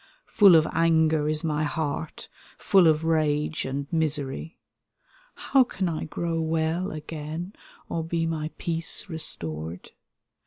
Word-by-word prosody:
Full 200 -5 +6
of 155 -1 +4
anger 160 -2 +2
is 155 +1 -1
my 155 -1 0
heart, 155 0 -3 0.3
full 190 -4 +4
of 155 0 +3
rage 155 -1 0
and 135 +1 -3
misery; 155 0 -2 0.8
How 270 -2 +3
can 195 -6 -3
I 160 -2 -3
grow 165 +1 -2
weU 160 +3 -1
again, 155 +4 -6 0.3
or 165 - -3
be 165 0 -1
my 155 -1 -2
peace 165 -1 0
restored? 85 - -3
160 Hz, 125 wpm, -26 LUFS, 150-165 Hz, 0.8 s, Full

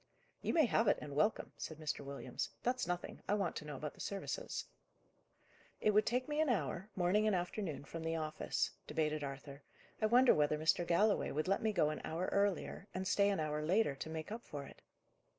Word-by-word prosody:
"You - - 0
may 320 -3 +6
have 230 -1 +2
it, - - +5
and 145 -2 -7
welcome," 210 +9 +1
said 160 - -5
Mr. 155 -1 -3
Williams. 140 0 -4
"That's 250 -5 0
nothing; 180 0 -3
I 205 - +3
want 195 -4 -1
to 150 - -6
know 150 -1 -5
about 150 +2 -5
the - - -20
services." 205 - -3 1.1
"It 215 - +3
would 210 +1 +4
take 250 +2 +1
me 300 +1 +1
an 315 - +2
hour, 205 -4 -1
morning 190 +4 +3
and 210 - +3
afternoon, 175 -4 -3
from 165 +3 -6
the 165 0 -1
office," 155 -1 -1 0.2
debated 155 -1 0
Arthur. 140 0 -7 0.4
"I 215 - +4
wonder 245 +3 +7
whether 150 0 +2
Mr. 160 +2 +2
Galloway 205 +5 +3
would 155 +4 -1
let 195 - +2
me 220 - +2
go 160 -7 +2
an 155 - -5
hour 170 +3 -2
earlier 200 -1 0
and 185 0 -2
stay 200 +2 +4
an 200 - 0
hour 150 -1 -1
later 185 +1 +3
to 160 - -5
make 160 +4 -5
up 235 +2 -5
for 145 -2 -6
it?" - - -14
175 Hz, 210 wpm, -36 LUFS, 155-210 Hz, 1.1 s, wonder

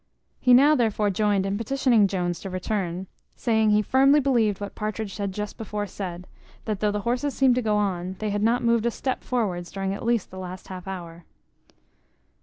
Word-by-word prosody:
He 250 -1 +6
now, 285 +4 +6
therefore, 220 -5 +1
joined 200 0 +1
in 195 +1 -2
petitioning 235 -3 +3
Jones 175 -3 -2
to 195 - -6
return; 185 -1 -3 0.3
saying 220 -2 +2
he 210 0 +4
firmly 275 +5 +5
believed 235 -8 +2
what 205 -1 -6
Partridge 215 -1 -4
had 200 -2 -2
just 210 +2 -5
before 210 -1 -3
said, 180 -2 -6 0.4
that 215 -3 -2
though 210 - +2
the 205 0 -2
horses 250 +5 -1
seemed 265 -2 +4
to 250 - +1
go 215 -2 +1
on, 190 -3 -1
they 215 -1 -2
had 205 0 -1
not 235 +3 +2
moved 235 -1 +2
a - - +3
step 260 +2 -3
forwards 190 -8 -2
during 195 0 -2
at 200 - -6
least 235 -3 0
the 190 - -8
last 185 0 -8
half 185 0 -8
hour. 175 -3 -7
210 Hz, 200 wpm, -25 LUFS, 190-235 Hz, 0.4 s, He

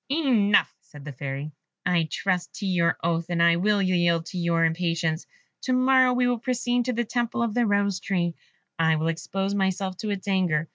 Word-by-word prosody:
"Enough," 250 -9 +2
said 150 -4 -14
the 145 - -6
Fairy; 140 +3 -5 0.3
"I 175 -3 +2
trust 185 -2 -2
to 205 - -5
your 175 -3 +1
oath, 170 0 0
and 175 -1 -1
I 170 0 +5
will 205 +2 +2
yield 175 -3 +1
to 185 - -7
your 170 -1 +2
impatience. 165 0 -1 0.4
To 255 - +1
morrow 255 0 +4
we 250 0 +2
will 245 -1 +1
proceed 245 0 -1
to 250 - -1
the 240 +1 -1
temple 235 +1 -1
of 230 -3 -1
the 240 0 +1
Rose 200 -2 +1
tree. 175 -3 -1 0.5
I 160 -1 +3
will 160 +1 0
expose 195 +4 -3
myself 190 -1 -1
to 215 - -4
its 200 -1 -4
anger. 175 -5 +1
185 Hz, 195 wpm, -25 LUFS, 170-225 Hz, 0.5 s, I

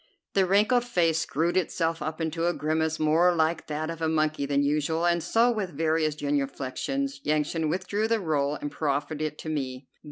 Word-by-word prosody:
The 190 -2 +3
wrinkled 215 +6 +3
face 170 -9 +1
screwed 165 +2 0
itself 165 -2 0
up 155 +2 -4
into 165 +1 -1
a 175 - +2
grimace 160 +1 0
more 165 +3 +4
like 160 0 0
that 155 +2 -3
of 165 0 -8
a 160 - +1
monkey 155 -2 0
than 140 0 +2
usual, 150 +3 0
and 170 0 +2
so, 230 +9 +3
with 195 -10 -4
various 155 -1 +1
genuflections, 145 - -2
Yansan 155 +1 0
withdrew 205 +5 -1
the 230 0 +1
roll 150 -5 0
and 145 -1 -5
proffered 150 +1 -2
it 155 -1 -2
to 155 - -6
me. 130 -3 -3
160 Hz, 185 wpm, -27 LUFS, 150-175 Hz, -, more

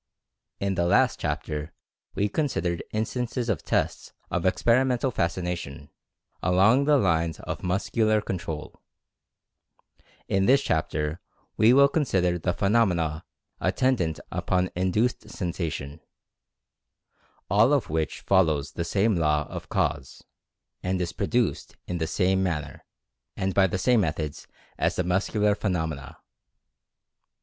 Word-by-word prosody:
In 100 0 0
the 85 -2 0
last - - +3
chapter 75 0 -3 0.4
we 100 +1 +1
considered 90 - -1
instances 120 +2 -2
of 100 -9 0
tests - - -1 0.2
of - - 0
Experimental 125 +2 +2
Fascination, 85 - -3 0.5
along 100 +9 +4
the 150 0 +5
lines 80 - +1
of - - -5
Mus 95 +2 -1
cular 110 -2 +2
Control. 80 -4 -5 1.5
In 95 0 +1
this 135 +2 +5
chapter 75 0 -1 0.3
we 110 +2 +5
will 140 +2 +7
consider 95 - +1
the 90 - 0
phenomena 90 -6 +1 0.3
attendant 115 -12 +1
upon 90 0 0
Induced 95 +7 0
Sensation, 80 -5 -4 1.5
all 105 +7 +4
of 145 -3 +2
which 80 -2 -2
follows 80 -7 +2
the 85 - -3
same 100 +5 +1
law 75 -3 +1
of - - -7
Cause, 65 -2 -2 0.6
and 95 0 -1
is 90 0 -2
pro 100 - -2
duced 120 -1 -1
in 90 -1 -4
the 80 - -1
same 95 +2 +1
manner, 80 -6 -3 0.5
and 95 -1 -1
by 95 0 +4
the 95 - -2
same 120 +3 +3
methods 75 -3 -3 0.3
as - - +1
the 90 - 0
muscular 105 +3 +1
phenomena. 80 -9 -3
95 Hz, 125 wpm, -26 LUFS, 80-110 Hz, 1.5 s, will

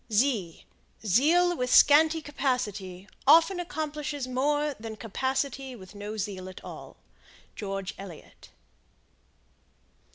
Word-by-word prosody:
Zeal 250 - +1
with 250 -4 -2
scanty 315 +2 +6
capacity 210 -10 -3 0.2
often 330 +5 +6
accomplishes 300 -5 -4
more 290 +3 0
than 220 0 -7
capacity 265 +4 -3
with 190 -3 -13
no 205 +1 -6
zeal 190 -2 -4
at 185 - -11
all. - - -10 0.6
George 195 -2 -4
Eliot. 190 -5 -12
255 Hz, 95 wpm, -28 LUFS, 200-295 Hz, 0.6 s, scanty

